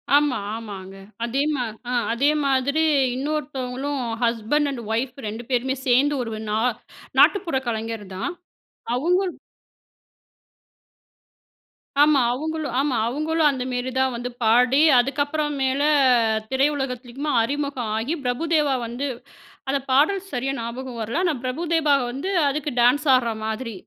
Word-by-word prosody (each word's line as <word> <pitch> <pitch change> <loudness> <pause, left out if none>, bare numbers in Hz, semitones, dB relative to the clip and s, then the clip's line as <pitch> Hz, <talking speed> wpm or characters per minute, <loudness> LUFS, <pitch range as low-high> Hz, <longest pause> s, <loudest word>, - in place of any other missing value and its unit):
ஆமா. 290 -4 +3 0.2
ஆமாங்க 195 -4 -8 0.3
அதே 265 +4 -1
மா 250 - -1 0.3
அ - - -1 0.2
அதே 275 +5 +2 0.2
மாதிரி 275 +4 +2 0.3
இன்னொருத்தவங்களும் 275 -1 -3 0.2
ஹஸ்பண்ட் 235 +6 +1
அண்ட் 245 -3 -5
ஒயிஃப் 250 +4 -2
2 225 +3 -5
பேருமே 260 +2 0
சேர்ந்து 275 +4 +4
ஒரு 225 - -6 0.2
நா 215 - 0 0.6
நாட்டுப்புற 355 -9 +4
கலைஞர் 225 -2 -3
தான் 190 - -3 0.6
அவுங்க 350 +8 +2 2.8
ஆமா 295 -2 +4
அவுங்களும், 310 0 -3
ஆமா 275 -3 +1
அவுங்களும் 310 +4 +1
அந்தமேரி 255 -1 -2
தான் 265 -1 +2
வந்து 245 +1 -4
பாடி 250 +5 +4 0.2
அதுக்கப்புறம் 290 +3 0
மேல 265 +1 +1 0.7
திரையுலகத்திலுமா 270 0 -1
அறிமுகம் 275 -4 -2
ஆகி 250 +9 -1
பிரபுதேவா 295 +2 +1
வந்து 245 +5 -4 0.6
அந்த 280 0 +1
பாடல் 315 +9 +3
சரியா 260 +2 -1
ஞாபகம் 240 +1 -6
வரல, 235 +11 -1
ஆனா 340 -4 +2
பிரபுதேபா 315 +2 +1 0.2
வந்து 280 +10 -4 0.2
அதுக்கு 295 +1 -2
டான்ஸ் 285 +5 +3
ஆடுற 235 -2 +1
மாதிரி. 220 +1 -4
265 Hz, 120 wpm, -23 LUFS, 245-295 Hz, 2.8 s, சேர்ந்து